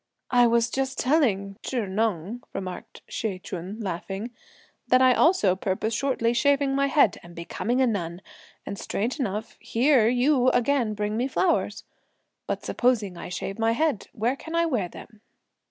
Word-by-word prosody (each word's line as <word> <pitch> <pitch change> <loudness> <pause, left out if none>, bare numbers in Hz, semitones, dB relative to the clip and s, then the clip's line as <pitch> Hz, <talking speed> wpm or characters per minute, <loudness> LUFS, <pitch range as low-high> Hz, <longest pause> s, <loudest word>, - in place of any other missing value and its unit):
"I 245 -1 +6
was 235 0 +2
just 265 0 -2
telling 210 -9 +1
Chih 245 -5 -2
Neng," 205 +2 -2
remarked 190 +4 -7
Hsi 205 -4 -3
Ch'un 185 +3 -7
laughing, 195 +3 -4 0.6
"that 255 - +5
I 255 -1 +6
also 280 - +4
purpose 195 +4 -2
shortly 240 -2 +1
shaving 280 +1 +2
my 275 0 +2
head 280 - +3
and 175 0 -14
becoming 230 +9 -2
a - - +5
nun; 180 -5 -3 0.4
and 200 - -6
strange 240 +8 -2
enough, 215 -3 -3
here 245 -1 +3
you 255 +2 +3
again 245 -4 +1
bring 210 +1 -2
me 250 +3 0
flowers; 340 +6 0 0.6
but - - -3
supposing 225 -7 +1
I - - -7
shave 195 +3 -5
my 225 0 +2
head, 295 -3 0
where 235 +5 0
can 320 +4 -7
I 335 0 +3
wear 235 - -1
them?" 215 +2 -13
230 Hz, 160 wpm, -26 LUFS, 200-260 Hz, 0.6 s, I